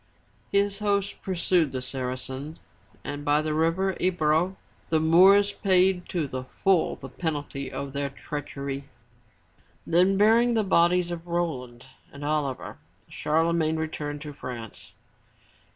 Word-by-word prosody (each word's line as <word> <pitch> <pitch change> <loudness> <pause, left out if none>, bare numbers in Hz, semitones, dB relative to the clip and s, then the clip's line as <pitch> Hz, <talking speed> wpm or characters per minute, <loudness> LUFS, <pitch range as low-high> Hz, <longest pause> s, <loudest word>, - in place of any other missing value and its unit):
His 200 0 +1
host 200 -1 -1
pursued 175 -4 +1
the 130 - -3
Saracens 130 +3 -5 0.5
and 145 0 -5
by 145 +1 +2
the 155 0 -1
river 165 +5 +1
E'bro, 175 0 +1 0.3
the 160 - +3
Moors 190 +6 +6
paid 185 -1 +2
to 165 -5 -1
the 130 -1 -5 0.2
full 190 -4 +3
the 135 - -9
penalty 145 -1 -4
of 140 -1 -5
their 140 0 -2
treach 145 +1 -7
ery. 140 0 -4 1.0
Then 180 +3 +3
bearing 230 +3 +4
the 220 - +2
bodies 175 -1 +3
of 170 0 -6
Roland 130 -9 -3 0.3
and 140 +1 -8
Oliver, 145 -3 -2 0.3
Charlemagne 160 0 +1
returned 150 -2 -4
to 150 -1 -7
France. 120 -5 -8
160 Hz, 130 wpm, -26 LUFS, 140-185 Hz, 1.0 s, Moors